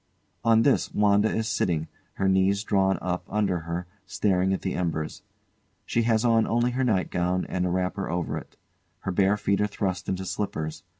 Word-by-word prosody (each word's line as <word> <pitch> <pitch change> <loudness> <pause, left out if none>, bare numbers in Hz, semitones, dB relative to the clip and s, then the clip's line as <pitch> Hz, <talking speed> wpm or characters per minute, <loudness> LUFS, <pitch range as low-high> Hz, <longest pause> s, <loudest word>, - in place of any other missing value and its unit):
[On 115 -1 +5
this 140 - +2
WANDA 105 +1 +4
is 110 0 -1
sitting, 80 -7 0 0.3
her 95 - 0
knees 95 +1 +3
drawn 95 -2 +2
up 90 0 -2
under 100 -4 0
her, 85 +2 -4 0.2
staring 95 -1 +1
at 95 - -1
the 95 - -1
embers. 80 -3 -2 0.6
She 115 - +1
has 110 +1 +2
on 115 -2 +4
only 120 +1 +1
her 130 +2 0
nightgown 90 -5 0
and 90 0 -1
a - - -1
wrapper 95 +2 -1
over 85 0 -2
it; - - -16 0.4
her 95 - -2
bare 100 +3 +3
feet 100 0 0
are 105 - +2
thrust 95 -2 -3
into 95 0 -2
slippers. 90 -5 -3
95 Hz, 180 wpm, -26 LUFS, 90-105 Hz, 0.6 s, On